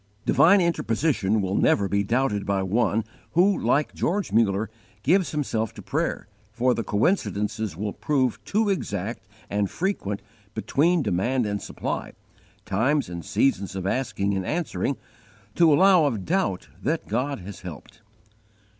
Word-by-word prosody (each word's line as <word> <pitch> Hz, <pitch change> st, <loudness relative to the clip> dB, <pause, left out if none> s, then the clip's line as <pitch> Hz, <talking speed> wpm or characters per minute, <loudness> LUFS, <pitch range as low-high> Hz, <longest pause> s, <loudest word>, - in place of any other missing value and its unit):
Divine 195 Hz, +4 st, +5 dB
interposition 115 Hz, -, +1 dB
will 95 Hz, 0 st, -2 dB
never 100 Hz, 0 st, +3 dB
be 100 Hz, +1 st, +1 dB
doubted 115 Hz, -2 st, 0 dB
by 100 Hz, -1 st, 0 dB
one 110 Hz, +2 st, +1 dB, 0.3 s
who, 190 Hz, +4 st, +4 dB
like 150 Hz, -3 st, +1 dB
George 200 Hz, +4 st, -1 dB
Muller, 105 Hz, -1 st, +2 dB, 0.4 s
gives 180 Hz, +5 st, +3 dB
himself 115 Hz, -8 st, -2 dB
to -, -, -10 dB
prayer, -, -, -2 dB, 0.2 s
for 120 Hz, +3 st, +2 dB
the 115 Hz, -, -2 dB
coincidences 105 Hz, -, 0 dB
will 105 Hz, +1 st, -3 dB
prove 130 Hz, -5 st, 0 dB
too 215 Hz, +1 st, +1 dB
exact 110 Hz, -, -3 dB, 0.2 s
and 100 Hz, -1 st, -1 dB
frequent 165 Hz, -, -2 dB, 0.3 s
between 155 Hz, +9 st, +2 dB
demand 120 Hz, +7 st, 0 dB
and 100 Hz, -1 st, -2 dB
supply, -, -, -4 dB, 0.5 s
times 130 Hz, +8 st, +1 dB
and 85 Hz, -1 st, -6 dB
seasons 100 Hz, -, 0 dB
of 95 Hz, -1 st, -4 dB
asking 100 Hz, -3 st, -1 dB
and 95 Hz, -1 st, -1 dB
answering, 150 Hz, -, -2 dB, 0.6 s
to 170 Hz, -2 st, +5 dB
allow 180 Hz, +2 st, +6 dB
of 115 Hz, -9 st, -1 dB
doubt 180 Hz, -, 0 dB
that 155 Hz, +4 st, -1 dB
God 130 Hz, +6 st, -1 dB
has 100 Hz, +2 st, -9 dB
helped. 85 Hz, -5 st, -10 dB
115 Hz, 140 wpm, -25 LUFS, 100-155 Hz, 0.6 s, allow